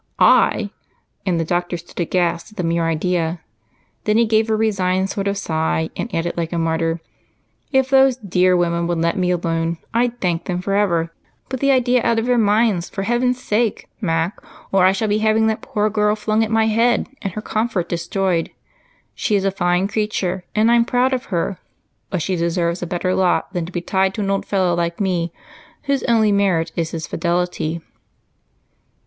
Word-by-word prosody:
"I!" -, -, +4 dB, 0.6 s
And 175 Hz, -3 st, +1 dB
the 165 Hz, -, 0 dB
doctor 175 Hz, +1 st, -1 dB
stood 170 Hz, +2 st, -12 dB
aghast 175 Hz, 0 st, 0 dB
at -, -, -23 dB
the 180 Hz, -, -1 dB
mere 165 Hz, 0 st, +1 dB
idea, 165 Hz, +1 st, 0 dB, 0.7 s
then 210 Hz, 0 st, +3 dB
he 235 Hz, -, +4 dB
gave 220 Hz, 0 st, +2 dB
a 220 Hz, -, +2 dB
resigned 190 Hz, -3 st, +1 dB
sort 200 Hz, -1 st, -2 dB
of 200 Hz, 0 st, 0 dB
sigh 160 Hz, -3 st, -1 dB
and 235 Hz, -, -4 dB
added 170 Hz, -1 st, -2 dB
like 165 Hz, -1 st, -2 dB
a 170 Hz, -, -2 dB
martyr, 165 Hz, 0 st, 0 dB, 0.7 s
"If 265 Hz, -1 st, +2 dB
those 265 Hz, -1 st, +5 dB
dear 185 Hz, -4 st, +2 dB
women 170 Hz, -1 st, 0 dB
would 175 Hz, -1 st, -1 dB
let 165 Hz, +1 st, +1 dB
me 180 Hz, -2 st, 0 dB
alone, 165 Hz, -1 st, -1 dB, 0.2 s
I'd 240 Hz, +1 st, 0 dB
thank 170 Hz, -2 st, -1 dB
them 180 Hz, -2 st, -2 dB
forever. 180 Hz, -4 st, 0 dB, 0.4 s
Put 260 Hz, -, -3 dB
the 275 Hz, -, +2 dB
idea 250 Hz, -2 st, +3 dB
out 230 Hz, -, +2 dB
of 225 Hz, -, 0 dB
their 245 Hz, -1 st, +2 dB
minds 210 Hz, -4 st, +2 dB
for 195 Hz, -, -4 dB
heaven's 245 Hz, +3 st, +1 dB
sake, 220 Hz, +1 st, 0 dB
Mac, 165 Hz, -1 st, -1 dB, 0.3 s
or 190 Hz, -1 st, +4 dB
I -, -, +5 dB
shall 205 Hz, +3 st, -1 dB
be 210 Hz, +1 st, +1 dB
having 220 Hz, 0 st, +3 dB
that 220 Hz, 0 st, 0 dB
poor 210 Hz, 0 st, -1 dB
girl 210 Hz, 0 st, +1 dB
flung 215 Hz, +1 st, +1 dB
at 220 Hz, -, -2 dB
my 225 Hz, 0 st, +3 dB
head 230 Hz, +2 st, +2 dB
and 195 Hz, -3 st, -4 dB
her 215 Hz, -, -4 dB
comfort 215 Hz, -6 st, -1 dB
destroyed. 170 Hz, 0 st, -1 dB, 0.6 s
She 210 Hz, -, 0 dB
is 195 Hz, -1 st, +1 dB
a 195 Hz, -, +2 dB
fine 180 Hz, 0 st, +1 dB
creature 200 Hz, -4 st, -2 dB
and 220 Hz, +2 st, +4 dB
I'm 235 Hz, 0 st, +5 dB
proud 250 Hz, +1 st, +1 dB
of 255 Hz, -, -2 dB
her, 180 Hz, 0 st, -2 dB, 0.5 s
but 180 Hz, -5 st, -2 dB
she 185 Hz, -, -1 dB
deserves 170 Hz, 0 st, -1 dB
a 175 Hz, -, -3 dB
better 180 Hz, +1 st, -1 dB
lot 185 Hz, +1 st, +1 dB
than 175 Hz, -3 st, -2 dB
to -, -, -9 dB
be 175 Hz, -, -3 dB
tied 190 Hz, +1 st, 0 dB
to 215 Hz, -, -3 dB
an 195 Hz, -1 st, 0 dB
old 195 Hz, -, -1 dB
fellow 185 Hz, -3 st, +1 dB
like 170 Hz, 0 st, -1 dB
me 175 Hz, -4 st, 0 dB, 0.5 s
whose 280 Hz, -1 st, 0 dB
only 225 Hz, -3 st, +3 dB
merit 185 Hz, -5 st, +1 dB
is 165 Hz, -1 st, -1 dB
his 165 Hz, -1 st, -5 dB
fidelity." 170 Hz, -2 st, -1 dB
190 Hz, 195 wpm, -20 LUFS, 170-220 Hz, 0.7 s, those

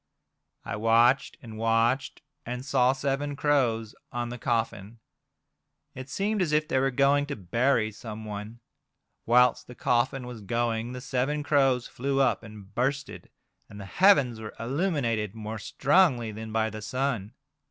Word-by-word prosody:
I 100 Hz, -, -4 dB
watched 115 Hz, +4 st, +3 dB
and 110 Hz, -2 st, -9 dB
watched, 115 Hz, +4 st, +1 dB, 0.2 s
and 125 Hz, +2 st, -5 dB
saw 130 Hz, -2 st, +3 dB
seven 140 Hz, +1 st, -2 dB
crows 120 Hz, -7 st, +1 dB, 0.2 s
on 120 Hz, 0 st, -3 dB
the 125 Hz, 0 st, -7 dB
coffin. 115 Hz, -3 st, -2 dB, 1.0 s
It 130 Hz, +1 st, -9 dB
seemed 205 Hz, +7 st, -1 dB
as 170 Hz, -4 st, 0 dB
if 155 Hz, 0 st, +2 dB
they 130 Hz, -, +1 dB
were 135 Hz, +1 st, +2 dB
going 140 Hz, +2 st, +2 dB
to 140 Hz, -, -4 dB
bury 110 Hz, +3 st, +1 dB
someone. 110 Hz, 0 st, -8 dB, 0.7 s
Whilst 125 Hz, +1 st, +4 dB
the 125 Hz, -, -11 dB
coffin 125 Hz, +2 st, 0 dB
was 120 Hz, -3 st, -8 dB
going 115 Hz, +2 st, -1 dB
the 125 Hz, -, -6 dB
seven 135 Hz, +3 st, -1 dB
crows 135 Hz, -4 st, +2 dB
flew 135 Hz, +2 st, -2 dB
up 135 Hz, -, +2 dB
and 105 Hz, -3 st, -12 dB
bursted, 135 Hz, +2 st, -2 dB, 0.4 s
and 100 Hz, -, -11 dB
the 100 Hz, -, -7 dB
heavens 140 Hz, -, +4 dB
were 110 Hz, -1 st, -8 dB
illuminated 120 Hz, -, -1 dB
more 110 Hz, 0 st, -6 dB
strongly 135 Hz, -, +2 dB
than 110 Hz, +1 st, -7 dB
by 110 Hz, 0 st, 0 dB
the 110 Hz, +1 st, -7 dB
sun. 120 Hz, -1 st, -2 dB
120 Hz, 150 wpm, -27 LUFS, 110-135 Hz, 1.0 s, Whilst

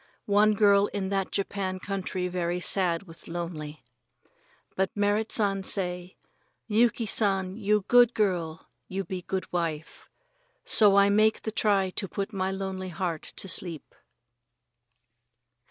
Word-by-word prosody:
One 210 Hz, +1 st, +3 dB
girl 200 Hz, -1 st, +4 dB
in 195 Hz, -2 st, -4 dB
that 195 Hz, -1 st, -1 dB
Japanese 190 Hz, -2 st, -3 dB
country 190 Hz, -2 st, -3 dB
very 175 Hz, -1 st, -2 dB
sad 180 Hz, -1 st, 0 dB
with 165 Hz, -3 st, -13 dB
lonely. 155 Hz, -4 st, -6 dB, 0.9 s
But 190 Hz, 0 st, 0 dB
Merrit 205 Hz, +2 st, +1 dB
San 200 Hz, -3 st, +1 dB
say: 180 Hz, -2 st, -1 dB, 0.5 s
"Yuki 230 Hz, +2 st, +2 dB
San, 195 Hz, -3 st, +1 dB
you 210 Hz, -2 st, 0 dB
good 245 Hz, -1 st, +5 dB
girl, 175 Hz, -, -1 dB, 0.2 s
you 195 Hz, +1 st, -3 dB
be 185 Hz, 0 st, -5 dB
good 190 Hz, +1 st, -3 dB
wife." 160 Hz, -3 st, -4 dB, 0.6 s
So 205 Hz, -3 st, +6 dB
I 200 Hz, 0 st, +5 dB
make 215 Hz, +1 st, +3 dB
the 220 Hz, -, -3 dB
try 200 Hz, -3 st, +1 dB
to 195 Hz, -, -3 dB
put 200 Hz, +3 st, -5 dB
my 190 Hz, -1 st, -1 dB
lonely 190 Hz, -1 st, -4 dB
heart 170 Hz, -2 st, -3 dB
to -, -, -8 dB
sleep. 170 Hz, -5 st, -5 dB
190 Hz, 135 wpm, -27 LUFS, 180-205 Hz, 0.9 s, So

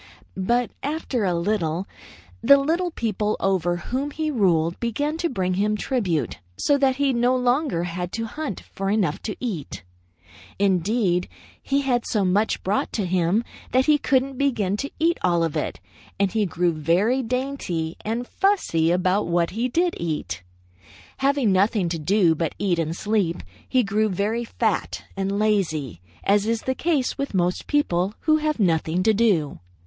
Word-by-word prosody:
But 235 Hz, +6 st, 0 dB
after 280 Hz, -6 st, -2 dB
a 180 Hz, -2 st, +1 dB
little, 170 Hz, -1 st, -1 dB, 0.5 s
the 280 Hz, -, +7 dB
little 330 Hz, +6 st, 0 dB
people 215 Hz, -, -1 dB
over 175 Hz, -3 st, +1 dB
whom 260 Hz, +10 st, -3 dB
he 310 Hz, +1 st, -2 dB
ruled 170 Hz, -, +2 dB
began 290 Hz, +7 st, -1 dB
to 340 Hz, 0 st, -1 dB
bring 185 Hz, -7 st, -1 dB
him 210 Hz, +3 st, +1 dB
tribute, 185 Hz, -, -1 dB, 0.2 s
so 285 Hz, -, +3 dB
that 270 Hz, -1 st, +3 dB
he 275 Hz, -1 st, +1 dB
no 245 Hz, +1 st, +2 dB
longer 250 Hz, -, +1 dB
had 175 Hz, 0 st, -4 dB
to 225 Hz, 0 st, -2 dB
hunt 285 Hz, -, -5 dB
for 195 Hz, 0 st, -2 dB
enough 200 Hz, -7 st, 0 dB
to 210 Hz, -, -4 dB
eat. 195 Hz, -, -5 dB, 0.7 s
Indeed, 190 Hz, -1 st, +1 dB, 0.3 s
he 275 Hz, +1 st, 0 dB
had 245 Hz, -4 st, +1 dB
so 205 Hz, -3 st, +1 dB
much 205 Hz, +4 st, +1 dB
brought 195 Hz, +3 st, 0 dB
to 210 Hz, -, -1 dB
him, 180 Hz, +4 st, +1 dB, 0.3 s
that 260 Hz, +1 st, +4 dB
he 300 Hz, -1 st, +4 dB
couldn't 265 Hz, -1 st, +1 dB
begin 220 Hz, -9 st, +1 dB
to 280 Hz, -, -3 dB
eat 335 Hz, +2 st, +1 dB
all 170 Hz, -2 st, +2 dB
of 165 Hz, -3 st, -2 dB
it, -, -, -2 dB, 0.4 s
and 200 Hz, -1 st, +2 dB
he 215 Hz, -1 st, +1 dB
grew 175 Hz, 0 st, +1 dB
very 180 Hz, -, +2 dB
dainty 245 Hz, -10 st, -2 dB
and 230 Hz, +3 st, -2 dB
fussy 355 Hz, -, +1 dB
about 185 Hz, +3 st, +1 dB
what 170 Hz, -1 st, +1 dB
he 235 Hz, +5 st, -1 dB
did 345 Hz, +6 st, +1 dB
eat. 150 Hz, -, -3 dB, 0.8 s
Having 270 Hz, -4 st, +2 dB
nothing 190 Hz, -1 st, +2 dB
to 165 Hz, -1 st, -3 dB
do 180 Hz, +1 st, +3 dB
but 160 Hz, 0 st, -2 dB
eat 180 Hz, -4 st, 0 dB
and 165 Hz, 0 st, -1 dB
sleep, 205 Hz, -6 st, 0 dB, 0.3 s
he 255 Hz, -2 st, +3 dB
grew 215 Hz, +1 st, +1 dB
very 210 Hz, +5 st, -1 dB
fat -, -, -1 dB
and 195 Hz, +1 st, -1 dB
lazy, 160 Hz, -, 0 dB, 0.2 s
as 205 Hz, +1 st, +2 dB
is 230 Hz, -1 st, 0 dB
the 260 Hz, -, 0 dB
case 290 Hz, -3 st, 0 dB
with 275 Hz, -7 st, -3 dB
most 180 Hz, 0 st, 0 dB
people 195 Hz, -9 st, +1 dB
who 310 Hz, 0 st, +3 dB
have 305 Hz, -3 st, -1 dB
nothing 170 Hz, -2 st, +1 dB
to 220 Hz, +2 st, +4 dB
do. 195 Hz, -, +1 dB
210 Hz, 165 wpm, -23 LUFS, 175-255 Hz, 0.8 s, the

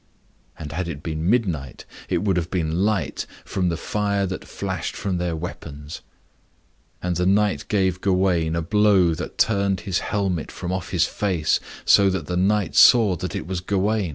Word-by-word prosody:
And 75 Hz, -2 st, -7 dB
had 90 Hz, +4 st, -3 dB
it 75 Hz, -3 st, -6 dB
been 80 Hz, +1 st, -2 dB
midnight, 90 Hz, -, -1 dB, 0.2 s
it -, -, 0 dB
would 100 Hz, -3 st, +1 dB
have 85 Hz, -1 st, -1 dB
been 85 Hz, 0 st, -1 dB
light, 100 Hz, -8 st, -1 dB, 0.2 s
from 90 Hz, -2 st, -1 dB
the 85 Hz, -, -2 dB
fire 100 Hz, +1 st, -1 dB
that 95 Hz, 0 st, -5 dB
flashed -, -, -4 dB
from 95 Hz, -3 st, -2 dB
their 90 Hz, -2 st, -1 dB
weapons. 75 Hz, -3 st, -7 dB, 1.0 s
And 90 Hz, -2 st, -1 dB
the 90 Hz, 0 st, +1 dB
knight 105 Hz, +1 st, +2 dB
gave 95 Hz, -3 st, 0 dB
Gawain 90 Hz, -4 st, +1 dB
a 85 Hz, -, -1 dB
blow 100 Hz, -2 st, +3 dB
that 85 Hz, -, -6 dB
turned 100 Hz, -3 st, +1 dB
his 95 Hz, -4 st, -1 dB
helmet 95 Hz, -5 st, -2 dB
from 90 Hz, -, -5 dB
off 95 Hz, -2 st, -3 dB
his 90 Hz, -2 st, +2 dB
face, 90 Hz, -7 st, 0 dB, 0.3 s
so 100 Hz, -1 st, +6 dB
that 95 Hz, -4 st, -2 dB
the 90 Hz, -, -3 dB
knight 100 Hz, +2 st, +1 dB
saw 110 Hz, -7 st, +7 dB
that 90 Hz, -1 st, -5 dB
it -, -, -4 dB
was 90 Hz, +1 st, -3 dB
Gawain. 100 Hz, +1 st, 0 dB
90 Hz, 180 wpm, -23 LUFS, 85-100 Hz, 1.0 s, saw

